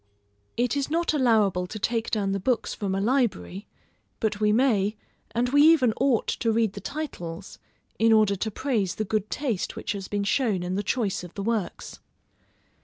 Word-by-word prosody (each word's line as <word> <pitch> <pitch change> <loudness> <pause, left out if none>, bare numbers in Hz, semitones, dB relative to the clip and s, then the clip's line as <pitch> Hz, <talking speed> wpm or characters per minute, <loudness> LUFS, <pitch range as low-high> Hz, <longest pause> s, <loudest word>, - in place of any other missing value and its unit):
It 245 +3 +1
is 280 0 -1
not 335 +1 +1
allowable 215 - +2
to 215 - -7
take 225 +2 -1
down 200 -3 0
the 195 - -1
books 240 +5 0
from 195 -3 -2
a - - 0
library; 205 - -1 0.5
but 210 -2 -1
we 210 0 +4
may, 215 -4 +2 0.3
and 235 +2 0
we 285 +2 +4
even 295 -7 +5
ought 265 -5 +2
to 230 - 0
read 220 -3 +1
the - - -8
titles, 175 - -6 0.4
in 225 0 +4
order 215 -2 +4
to 220 +3 -2
praise 215 -5 -1
the 215 - -2
good 215 +1 -1
taste 250 -10 -2
which - - -4
has 200 -2 -5
been 205 -1 -2
shown 200 -3 +1
in 180 +1 -3
the 195 - 0
choice 205 -3 -1
of 175 - -11
the 200 - -4
works. 220 -5 -3
220 Hz, 185 wpm, -26 LUFS, 195-245 Hz, 0.5 s, even